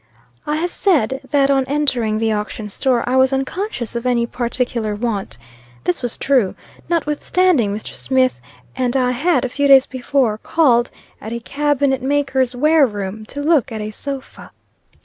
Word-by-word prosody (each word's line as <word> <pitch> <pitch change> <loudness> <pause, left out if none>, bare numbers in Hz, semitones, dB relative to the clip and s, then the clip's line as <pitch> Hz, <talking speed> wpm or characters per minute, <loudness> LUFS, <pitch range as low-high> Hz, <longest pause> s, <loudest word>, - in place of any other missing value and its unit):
I 300 - 0
have 345 +3 -2
said, 270 - +1
that 280 -1 +3
on 270 -1 +3
entering 255 -6 0
the 225 0 0
auction 210 0 -4
store, 245 +4 0
I 255 +1 +1
was 260 0 +4
unconscious 270 - -3
of 235 - -2
any 240 -1 +2
particular 235 -2 -2
want. 205 - -3 0.5
This 180 - -1
was 245 -2 -3
true, 255 -9 +1 0.3
notwithstanding 320 - +1
Mr. 210 +1 -6
Smith 260 - 0 0.3
and 250 +1 0
I 250 -1 +2
had, 290 +4 +1
a - - -2
few 285 +3 0
days 270 -1 +7
before, 255 -3 0
called 250 -7 +2 0.3
at 220 - -6
a 235 - -3
cabinet 280 0 0
maker's 265 -2 0
wareroom, 220 -8 +1
to 285 +1 -5
look 290 -5 +2
at 220 - -4
a 210 0 -4
sofa. 275 +4 -7
255 Hz, 160 wpm, -19 LUFS, 230-285 Hz, 0.5 s, days